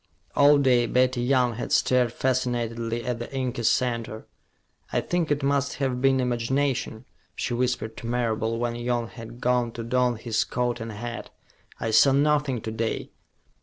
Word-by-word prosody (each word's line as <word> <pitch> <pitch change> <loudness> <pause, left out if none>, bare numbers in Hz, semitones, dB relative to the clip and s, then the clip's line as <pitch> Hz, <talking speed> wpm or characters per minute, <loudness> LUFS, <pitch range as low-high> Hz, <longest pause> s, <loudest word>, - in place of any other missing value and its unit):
All 145 0 +6
day, 125 -4 +3
Betty 125 +1 +2
Young 125 -1 +2
had - - -5
stared 125 -2 +3
fascinatedly 120 -2 -1
at 125 -2 -2
the 120 - -6
inky 130 -2 -2
center. 115 -2 0 0.7
"I - - +1
think 175 -2 -1
it 145 -1 0
must 140 -1 +1
have 130 -2 -1
been 135 0 +3
imagination," 125 -1 -1 0.3
she 120 - -2
whispered 120 -2 -1
to 115 - -7
Marable, 115 -2 -1
when 120 0 -1
Young 120 -1 -2
had 115 0 -10
gone 125 -1 +1
to 115 - -5
don 125 +1 +1
his 110 0 -1
coat 120 0 -2
and 115 0 -5
hat. 120 +3 -6 0.5
"I 115 - -2
saw 110 +5 +6
nothing 145 -3 +2
to 110 - -5
day." 110 0 -3
120 Hz, 165 wpm, -25 LUFS, 115-130 Hz, 0.7 s, All